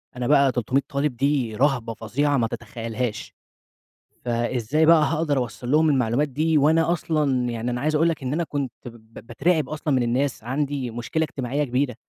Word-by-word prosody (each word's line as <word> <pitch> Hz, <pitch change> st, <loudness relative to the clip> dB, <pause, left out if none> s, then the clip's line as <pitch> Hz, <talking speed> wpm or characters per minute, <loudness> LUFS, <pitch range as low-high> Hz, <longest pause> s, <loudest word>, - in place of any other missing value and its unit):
أنا 125 Hz, -1 st, -3 dB
بقى 140 Hz, -2 st, +4 dB
300 125 Hz, +3 st, 0 dB
طالِب 140 Hz, -1 st, -1 dB
دي 135 Hz, -5 st, 0 dB
رهبة 125 Hz, -4 st, +1 dB
فظيعة 140 Hz, +7 st, 0 dB
ما 115 Hz, -, +1 dB
تتخيّلهاش. 115 Hz, 0 st, -5 dB, 0.9 s
فإزاي 120 Hz, +5 st, 0 dB
بقى 160 Hz, -1 st, +6 dB
هاقدَر 155 Hz, -2 st, 0 dB
أوصَّل 120 Hz, 0 st, -3 dB
لهم 155 Hz, +1 st, +4 dB
المعلومات 130 Hz, +1 st, +1 dB
دي 155 Hz, +4 st, +1 dB
وأنا 160 Hz, +3 st, +3 dB
أصلًا، 145 Hz, -7 st, 0 dB
يعني 115 Hz, +1 st, -3 dB
أنا 120 Hz, +1 st, -3 dB
عايز 155 Hz, +1 st, 0 dB
أقول 165 Hz, +2 st, +3 dB
لك 160 Hz, -4 st, -4 dB
إن 130 Hz, +1 st, -2 dB
أنا 170 Hz, +2 st, 0 dB
كنت 140 Hz, -5 st, -3 dB
ب -, -, -5 dB, 0.2 s
ب 115 Hz, -, -12 dB
باترعِب 150 Hz, +4 st, 0 dB
أصلًا 155 Hz, -1 st, -2 dB
من 125 Hz, -, +2 dB
الناس، 125 Hz, +1 st, -1 dB
عندي 135 Hz, 0 st, -2 dB
مشكلة 120 Hz, +7 st, -2 dB
إجتماعية 140 Hz, -1 st, -2 dB
كبيرة. 130 Hz, -1 st, -1 dB
135 Hz, 180 wpm, -23 LUFS, 120-150 Hz, 0.9 s, بقى